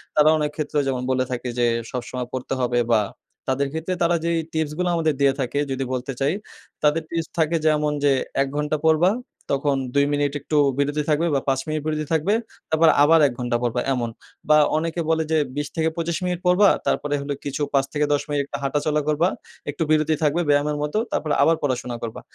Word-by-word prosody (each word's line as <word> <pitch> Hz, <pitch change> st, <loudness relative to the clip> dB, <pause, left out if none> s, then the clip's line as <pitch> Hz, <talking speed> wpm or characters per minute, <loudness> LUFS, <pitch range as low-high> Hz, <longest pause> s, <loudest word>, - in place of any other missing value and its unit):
তারা 150 Hz, 0 st, +6 dB
অনেক 150 Hz, -1 st, -1 dB
ক্ষেত্র 155 Hz, -1 st, -4 dB
যেমন 130 Hz, -2 st, -1 dB
বলে 130 Hz, 0 st, +2 dB
থাকে 125 Hz, 0 st, -3 dB
যে, 120 Hz, -, +3 dB, 0.3 s
"সবসময় 125 Hz, 0 st, -4 dB
পড়তে 130 Hz, +1 st, -3 dB
হবে" 120 Hz, 0 st, +1 dB
বা 110 Hz, -, +5 dB, 0.5 s
তাদের 135 Hz, +1 st, +1 dB
ক্ষেত্রে 160 Hz, +3 st, -2 dB
তারা 170 Hz, 0 st, +3 dB
যেই 170 Hz, 0 st, +1 dB
টিপসগুলা 160 Hz, +3 st, -1 dB
আমাদের 160 Hz, -2 st, +1 dB
দিয়ে 135 Hz, -1 st, +4 dB
থাকে 135 Hz, +2 st, -1 dB
যদি 135 Hz, 0 st, -1 dB
বলতে 130 Hz, +2 st, -3 dB
চাই, 140 Hz, +5 st, +1 dB, 0.5 s
তাদের 150 Hz, +2 st, +3 dB
টিপস 165 Hz, -1 st, -2 dB
থাকে 160 Hz, +1 st, +2 dB
যেমন 150 Hz, -1 st, +2 dB
যে, 140 Hz, -, +5 dB, 0.3 s
"১ 135 Hz, -, +1 dB
ঘন্টা 150 Hz, +1 st, 0 dB
পড়বা, 160 Hz, +4 st, +4 dB, 0.4 s
তখন 140 Hz, 0 st, +1 dB, 0.2 s
২ 140 Hz, 0 st, +4 dB
মিনিট 145 Hz, -1 st, +1 dB
একটু 150 Hz, +1 st, -1 dB, 0.2 s
বিরতি 145 Hz, +1 st, 0 dB
থাকবে 155 Hz, +3 st, +2 dB
বা -, -, +3 dB
৫ 135 Hz, 0 st, +1 dB
মিনিট 155 Hz, -1 st, -2 dB
বিরতি 155 Hz, -1 st, -1 dB
থাকবে, 160 Hz, +6 st, +2 dB, 0.4 s
তারপর 160 Hz, +1 st, +4 dB
আবার 165 Hz, +2 st, +6 dB
১ 135 Hz, -, -3 dB
ঘন্টা 120 Hz, -1 st, 0 dB
পড়বা" 120 Hz, 0 st, 0 dB
এমন 120 Hz, -2 st, -1 dB, 0.4 s
বা 150 Hz, -, +7 dB, 0.2 s
অনেকে 165 Hz, +2 st, -2 dB
বলে 160 Hz, 0 st, +2 dB
যে, 160 Hz, -, +3 dB, 0.2 s
"২০-২৫ 160 Hz, +2 st, -2 dB
মিনিট 180 Hz, -1 st, -1 dB
পড়বা 190 Hz, +3 st, +6 dB, 0.2 s
তারপরে 145 Hz, 0 st, 0 dB
হলো 140 Hz, 0 st, -3 dB
কিছু 140 Hz, +1 st, -3 dB
৫-১০ 145 Hz, +1 st, 0 dB, 0.2 s
হাঁটাচলা 150 Hz, +2 st, 0 dB
করবা, 155 Hz, +3 st, +2 dB, 0.4 s
একটু 145 Hz, +3 st, -2 dB
বিরতি 155 Hz, 0 st, +3 dB
থাকবে 155 Hz, +4 st, +2 dB
ব্যায়ামের 145 Hz, +1 st, +2 dB
মতো, 150 Hz, +8 st, -2 dB
তারপরে 155 Hz, -2 st, -1 dB
আবার 165 Hz, -, +4 dB
পড়াশোনা 125 Hz, -3 st, -1 dB
করবা।" 115 Hz, -, -5 dB
150 Hz, 185 wpm, -23 LUFS, 135-160 Hz, 0.5 s, বা